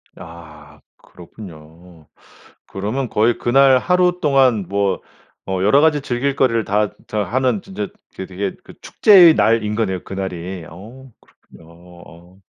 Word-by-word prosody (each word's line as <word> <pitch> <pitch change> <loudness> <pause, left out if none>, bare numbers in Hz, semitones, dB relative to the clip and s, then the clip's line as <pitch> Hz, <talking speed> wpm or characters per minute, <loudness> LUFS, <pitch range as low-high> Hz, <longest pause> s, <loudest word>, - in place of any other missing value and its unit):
아 75 -3 -14 0.2
그렇군요. 85 -3 -15 0.6
그러면 110 +7 -4
거의 110 +2 +1
그날 130 +1 +4
하루 180 +3 +1
동안 130 - +2
뭐 100 -1 -1 0.5
어 95 -1 -3
여러 105 +9 +4
가지 150 -3 +2
즐길 135 +2 -2
거리를 115 -5 +1
다 105 +1 0 0.2
자 105 -1 -2
하는 130 - -1
진짜 200 +1 -6 0.3
그 95 - -7
되게 95 +1 -5
그 - - -15
축제의 180 -6 +6
날인 110 -4 +1
거네요, 95 -5 -3
그날이. 95 -2 -6
어 115 +10 -14
그렇군요. 80 - -21
어. 85 +1 -17
105 Hz, 260 characters per minute, -18 LUFS, 90-130 Hz, 0.6 s, 축제의